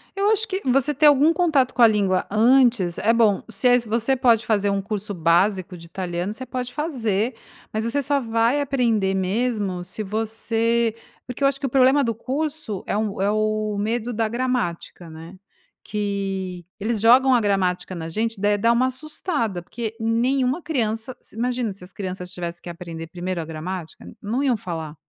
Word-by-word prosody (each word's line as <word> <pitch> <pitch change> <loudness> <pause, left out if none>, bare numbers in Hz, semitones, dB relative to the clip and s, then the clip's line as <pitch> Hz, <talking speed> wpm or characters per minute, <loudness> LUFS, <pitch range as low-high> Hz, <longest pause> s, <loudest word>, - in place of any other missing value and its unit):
Eu 400 +1 +2
acho 440 +1 +2
que 380 0 -3
você 275 +3 +2
ter 295 +2 +2
algum 295 +2 +6
contato 305 -8 +2
com - - 0
a 230 - +10
língua 200 -4 +1
antes 230 -4 +3
é 225 +2 +2
bom. 220 -4 +3
Se 225 +3 0
é 245 0 +6
se 235 - -9
você 230 +4 +1
pode 235 -3 +3
fazer 205 -2 +1
um 200 0 0
curso 205 0 -4
básico 180 +2 +1
de 170 - -12
italiano, 175 +2 -4
você 260 +4 -8
pode 250 0 -5
fazer, 240 - -1 0.4
mas 220 0 -2
você 255 +5 +1
só 285 +1 +1
vai 230 +3 +1
aprender 235 -8 +1
mesmo 195 -1 -1
se 185 +4 -6
você 225 +2 0 0.3
porque 250 +2 -5
eu - - +6
acho 275 0 0
que 275 - -3
o - - -5
problema 265 +2 +4
do 230 -3 -1
curso 275 -3 -3
é - - 0
um 210 -3 -2
é 200 - +2
o 215 -1 0
medo 230 +3 -1
da 225 -1 0
gramática, 230 -8 -3
né, 165 +3 -10 0.5
que 195 -4 -3
eles 220 +2 -1
jogam 255 +4 +6
a - - +4
gramática 190 -3 0
na 165 -2 -5
gente 220 +3 -2
daí 205 0 +3
dá 230 +3 +3
uma 245 +2 +3
assustada 260 - -3
porque 220 +4 -6
nenhuma 250 +6 +1
criança, 240 -5 -2
se - - -16
Imagina 245 -1 -1
se 190 - -15
as 180 - -13
crianças 185 -2 -6
tivessem 170 -1 -5
que - - -7
aprender 170 -1 -7
1º 175 +1 -4
a 160 - -6
gramática, 165 +1 -6
n - - -12
não 235 +7 -1
iam 255 -5 +2
falar, 160 -5 -6
220 Hz, 190 wpm, -23 LUFS, 190-250 Hz, 0.5 s, a